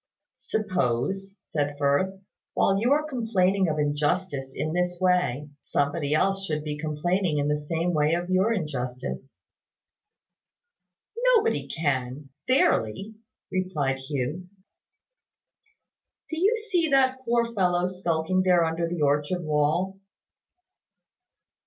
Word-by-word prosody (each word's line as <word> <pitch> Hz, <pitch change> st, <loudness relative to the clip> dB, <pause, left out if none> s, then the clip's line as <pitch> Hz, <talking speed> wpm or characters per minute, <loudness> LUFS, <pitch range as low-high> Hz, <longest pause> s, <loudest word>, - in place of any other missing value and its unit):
"Suppose," 190 Hz, -, -1 dB
said 145 Hz, -1 st, -2 dB
Firth, 145 Hz, +7 st, +1 dB, 0.4 s
"while 195 Hz, 0 st, +3 dB
you 240 Hz, +5 st, +1 dB
are 300 Hz, +1 st, +3 dB
complaining 200 Hz, -8 st, +1 dB
of 155 Hz, -1 st, -1 dB
injustice 145 Hz, -1 st, -1 dB
in 155 Hz, +1 st, -2 dB
this 180 Hz, 0 st, 0 dB
way, 180 Hz, -7 st, +1 dB
somebody 145 Hz, +1 st, 0 dB
else 195 Hz, +4 st, +1 dB
should 150 Hz, -1 st, -2 dB
be 150 Hz, -1 st, -3 dB
complaining 155 Hz, +3 st, -1 dB
in 145 Hz, 0 st, +1 dB
the 150 Hz, -, +2 dB
same 165 Hz, +4 st, -2 dB
way 155 Hz, +1 st, +2 dB
of 175 Hz, 0 st, -3 dB
your 190 Hz, +4 st, +3 dB
injustice." 135 Hz, -, -4 dB, 2.0 s
"Nobody 455 Hz, 0 st, +1 dB
can 135 Hz, -3 st, -2 dB, 0.2 s
fairly," 200 Hz, -, +2 dB, 0.4 s
replied 175 Hz, -8 st, -1 dB
Hugh. 145 Hz, +6 st, -4 dB, 1.8 s
"Do 320 Hz, -, -2 dB
you 415 Hz, +6 st, +3 dB
see 335 Hz, -4 st, +2 dB
that 260 Hz, -1 st, +3 dB
poor 235 Hz, -1 st, +1 dB
fellow, 180 Hz, -3 st, +2 dB
skulking 180 Hz, -1 st, 0 dB
there 180 Hz, -2 st, +4 dB
under 165 Hz, +1 st, -1 dB
the 170 Hz, -3 st, -2 dB
orchard 145 Hz, +5 st, +1 dB
wall?" 155 Hz, +6 st, 0 dB
170 Hz, 115 wpm, -26 LUFS, 145-190 Hz, 2.0 s, there